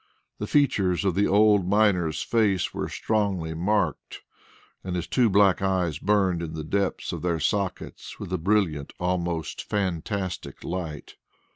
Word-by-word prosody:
The 105 - -3
features 100 - +2
of 95 - +2
the 100 +3 +2
old 105 -2 +4
miner's 95 -6 +2
face 105 -6 +1
were - - -3
strongly 100 -7 -1
marked, 95 0 -1 0.6
and 90 -1 -4
his 90 -1 -2
two 120 +5 +2
black 100 -2 +4
eyes 90 -5 0
burned 95 -4 +2
in 80 -1 -5
the 80 - -4
depths 100 +4 -1
of - - -5
their 85 -2 0
sockets 95 +2 -3
with - - -6
a - - 0
brilliant, 85 -6 0
almost 85 -3 -2
fantastic 95 -1 -3
light. 85 -5 -5
95 Hz, 145 wpm, -25 LUFS, 85-100 Hz, 0.6 s, old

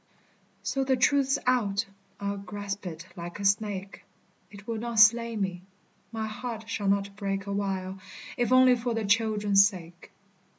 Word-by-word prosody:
So, 270 - -1
the 265 0 +2
truth's 275 +1 +3
out. 230 -4 +1 0.3
I'll 200 0 -3
grasp 200 0 -6
it 170 0 -7
like 175 +2 -7
a 200 - -4
snake, 200 -1 -1 0.5
It 200 -1 -13
will 225 -1 -3
not 235 0 -4
slay 230 +1 +5
me. 190 -4 -2 0.5
My 220 -1 -3
heart 220 0 -6
shall 205 -3 -3
not 200 0 0
break 195 -1 -3
Awhile, 195 -1 -3 0.4
if 245 0 0
only 255 0 +6
for 240 -1 -2
the 225 -1 -1
children's 205 -2 +4
sake. 175 -4 -10
205 Hz, 155 wpm, -28 LUFS, 195-230 Hz, 0.5 s, only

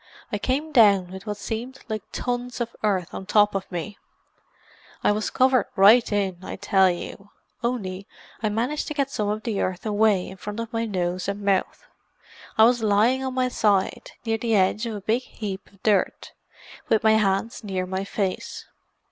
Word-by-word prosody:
I 205 - -1
came 280 +8 -1
down 200 -8 +5
with 190 +3 -9
what 210 -1 -3
seemed 235 +5 -5
like 215 -2 -3
tons 245 0 -3
of 235 -1 -3
earth 190 -5 0
on 190 - -7
top 210 0 +4
of 195 -1 -4
me; 180 +4 -5 1.0
I - - +4
was 210 +1 -1
covered 255 -3 +3
right 220 +5 +6
in, 195 -3 -1
I - - -5
tell 190 -1 +3
you, 190 +3 -6 0.3
only 200 -6 -3 0.3
I 215 - +1
managed 240 +8 -1
to 305 - -4
get 275 -2 0
some 210 -5 -1
of 215 +1 -2
the 220 -4 -1
earth 185 +2 -3
away 210 -3 +2
in 190 - -9
front 210 +3 -6
of 230 +1 -5
my 230 0 0
nose 180 -3 -2
and 200 +1 -3
mouth. 195 -2 0 0.7
I 220 - +7
was 240 +1 +5
lying 220 +5 +3
on 260 -1 -3
my 255 -1 +2
side, 205 -6 0
near 225 -1 0
the 225 -1 +1
edge 205 +4 +2
of 225 - -4
a 205 - -6
big 225 +5 +1
heap 205 -6 -7
of 195 -2 -25
dirt, 205 -4 +1 0.6
with 220 - +3
my 220 0 +5
hands 215 +1 +1
near 190 -3 -2
my 190 +1 -3
face. 195 -1 -3
210 Hz, 190 wpm, -24 LUFS, 195-230 Hz, 1.0 s, I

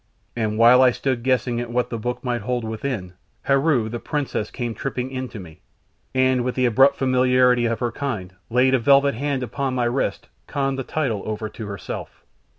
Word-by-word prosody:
And 110 -2 -1
while 120 +3 +7
I 130 - +7
stood 125 0 -2
guessing 125 -1 0
at 120 - -5
what 125 +1 -1
the 115 - -3
book 125 +3 -4
might 120 -2 -1
hold 125 +2 -2
within, 110 -4 -4 0.3
Heru, 135 -4 +2
the 120 +2 -5
princess, 145 -7 -3
came 120 -3 -4
tripping 125 +3 -4
in 130 -1 -4
to 110 - -8
me, 80 -5 -12 0.5
and 130 -1 +3
with 125 0 -2
the 130 - +2
abrupt 135 +4 +5
familiarity 125 -2 +3
of 115 +1 -2
her 120 -1 0
kind, 110 -9 -4 0.2
laid 125 +3 +3
a 130 - +4
velvet 140 +3 +4
hand 135 +2 -2
upon 130 +2 -2
my 125 -1 +1
wrist, 120 +3 -1 0.2
conned 135 -1 -1
the - - -2
title 125 -8 -2
over 110 0 -3
to 110 -1 -8
herself. 100 -3 -7
125 Hz, 195 wpm, -22 LUFS, 115-130 Hz, 0.5 s, while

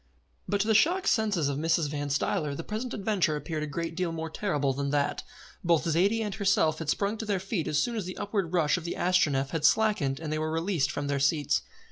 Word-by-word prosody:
But 200 +1 +1
to 210 - -1
the 220 - +4
shocked 350 - +3
senses 210 - +2
of 140 0 -2
Mrs. 165 0 +1
Van 145 0 -3
Stuyler 145 +1 0
the 165 - -5
present 220 +6 -4
adventure 195 -6 0
appeared 155 +1 -4
a 150 - -2
great 165 +2 -4
deal 180 -1 -1
more 160 -1 -5
terrible 145 -8 0
than 140 +1 -2
that. 145 0 0 0.4
Both 170 -2 +2
Zaidie 195 +8 +2
and 210 -2 -3
herself 190 -7 +2
had 160 -3 -4
sprung 205 +6 0
to 220 - -3
their 200 -3 +1
feet 190 -3 -3
as 150 - 0
soon 235 +11 0
as 210 -5 -3
the 185 - -6
upward 200 -5 -2
rush 170 -2 +2
of 175 - -6
the 170 - -4
Astronef 150 -7 +2
had 165 -3 -2
slackened 160 -8 +2
and 155 -1 -4
they 155 - -1
were 155 0 -2
released 165 -3 0
from 145 - -3
their 140 0 -1
seats. 145 +1 +2
165 Hz, 235 wpm, -28 LUFS, 150-200 Hz, 0.4 s, the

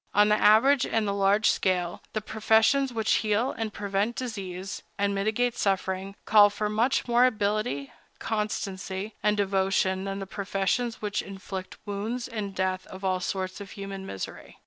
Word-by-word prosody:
On 210 +1 +6
the 210 - +5
average 250 +6 +6
and 220 -2 0
the 200 - 0
large 200 +2 +3
scale, 180 -2 0
the 215 - -1
professions 220 +5 +3
which 220 -2 +2
heal 220 +4 +1
and 225 -2 -3
prevent 205 +3 -1
disease, 195 -6 -5 0.2
and 200 0 +1
mitigate 220 +5 0
suffering, 195 0 -1
call 210 -1 +7
for 210 +1 -2
much 230 +6 +1
more 240 +1 +5
ability, 210 - -1 0.2
constancy, 200 -2 -3
and 210 0 +2
devotion 195 -1 +1
than 195 0 -3
the 195 - -4
professions 200 +4 -2
which 210 0 -1
inflict 190 -1 -7
wounds 220 +4 -3
and 210 -5 -5
death 185 0 -1
and 185 +1 -10
all 185 -1 +1
sorts 185 +1 -3
of 200 - -8
human 195 -1 -6
misery. 95 - -7
205 Hz, 160 wpm, -27 LUFS, 195-220 Hz, 0.2 s, call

